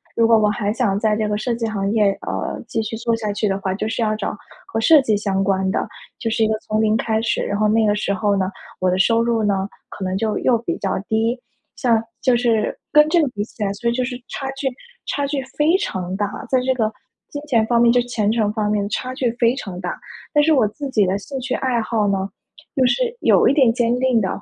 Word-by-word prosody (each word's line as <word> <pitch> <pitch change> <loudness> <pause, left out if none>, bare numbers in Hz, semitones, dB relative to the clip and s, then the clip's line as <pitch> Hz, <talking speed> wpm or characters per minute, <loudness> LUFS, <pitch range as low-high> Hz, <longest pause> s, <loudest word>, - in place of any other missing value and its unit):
如 230 -1 +4
果 225 -1 +6
我 210 -1 +3
还 210 -1 -1
想 205 -4 0
在 215 -1 +2
这 215 -1 -1
个 210 - 0
设 235 +3 -1
计 230 -1 -3
行 200 -2 -2
业， 210 -3 +3 0.2
呃， - - -3
继 225 -1 -2
续 225 +1 -4
做 230 0 0
下 215 -2 -3
去 210 +1 -1
的 195 -1 0
话， 190 -1 -2
就 215 +3 -3
是 225 +1 -2
要 215 -1 +1
找 215 - -3 0.3
和 225 - -4
设 295 +6 +6
计 220 -5 +1
相 195 -2 -1
关 190 -1 +1
的， - - -1 0.3
就 230 - -2
是 225 0 +1
一 - - +3
个 215 0 0
从 215 0 -1
零 220 0 +3
开 220 -1 0
始， 230 0 0
然 200 - -2
后 215 0 +2
那 220 +1 +3
个 205 - +2
时 205 -1 -1
候 200 +1 +1
呢， 190 0 -1 0.3
我 185 - +2
的 185 - 0
收 230 +3 +3
入 230 -1 +1
呢， 195 -1 0 0.2
可 195 - -8
能 185 0 -1
就 215 +1 -1
又 245 -2 +3
比 230 - -3
较 190 -1 -1
低。 225 +3 0 0.4
像 230 -3 +2 0.2
就 255 -2 +3
是 235 -3 +1
跟 300 +1 +6
这 335 +1 +3
个 290 - +1
比 205 -4 -4
起 220 - -7
来， 200 - 0
所 235 +4 -1
以 235 - 0
就 255 - 0
是 245 0 -4
差 270 -1 -4
距 270 - -1 0.4
差 285 - -1
距 280 -1 -2 0.2
非 315 +5 +4
常 185 - -3
大。 205 +4 -3
在 260 - +3
这 260 0 +2
个 220 -3 0 0.4
金 290 - -6
钱 230 -5 +3
方 235 -1 +3
面 235 - +5
就 245 +1 +4
前 240 -4 -1
程 220 -2 +1
方 210 -1 -1
面 205 -1 0
差 255 +5 -3
距 255 -3 0
非 235 +1 +3
常 190 -9 -6
大， 180 -2 -4 0.4
但 295 -1 +4
是 320 - +3
我 255 -8 +4
自 280 +7 -6
己 215 -6 +3
的 190 +2 0
兴 270 +6 -6
趣 255 0 -3
爱 250 -3 0
好 215 -2 0
呢， 195 0 -1 0.5
又 260 -3 +3
是 475 - 0
有 - - +5
一 - - +4
点 265 -5 +5
坚 240 0 +1
定 255 -2 +2
的， 195 - 0
225 Hz, 280 characters per minute, -20 LUFS, 205-245 Hz, 0.5 s, 果